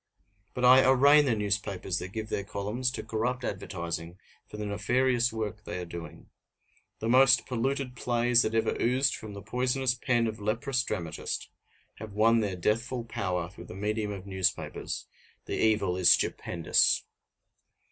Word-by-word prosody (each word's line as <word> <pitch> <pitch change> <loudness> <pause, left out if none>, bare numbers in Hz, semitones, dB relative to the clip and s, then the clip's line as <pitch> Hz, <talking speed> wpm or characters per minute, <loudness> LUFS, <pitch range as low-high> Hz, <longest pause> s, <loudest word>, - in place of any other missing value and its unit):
But 125 - 0
I 130 +1 +8
arraign 140 +3 +6
the 125 -4 +2
newspapers 100 -3 -2
that 90 - -7
give 110 +1 -5
their 100 - -2
columns 105 +6 -2
to 125 - -5
corrupt 120 +3 -2
advertising 85 -4 -5 0.3
for - - -10
the 105 - -4
nefarious 125 +4 +1
work 110 -1 -4
they - - -5
are 90 - -5
doing. 85 0 -10 0.7
The 110 - -4
most 130 +1 +5
polluted 130 +1 -2
plays 120 -1 +2
that 110 0 -1
ever 115 - +1
oozed 130 +3 +2
from 110 -1 -8
the 100 - -8
poisonous 125 0 0
pen 120 -2 +1
of 110 0 -4
leprous 120 +5 -1
dramatist 85 -9 -4 0.5
have 105 -1 -9
won 115 +2 +4
their 100 -4 -1
deathful 115 +6 -1
power 90 -4 -2
through - - -12
the - - -10
medium 105 +2 -2
of 100 -2 -7
newspapers; 95 -2 -2 0.4
the - - -5
evil 105 -5 +2
is 90 -2 +5
stupendous! 85 -2 +2
110 Hz, 155 wpm, -28 LUFS, 100-125 Hz, 0.7 s, I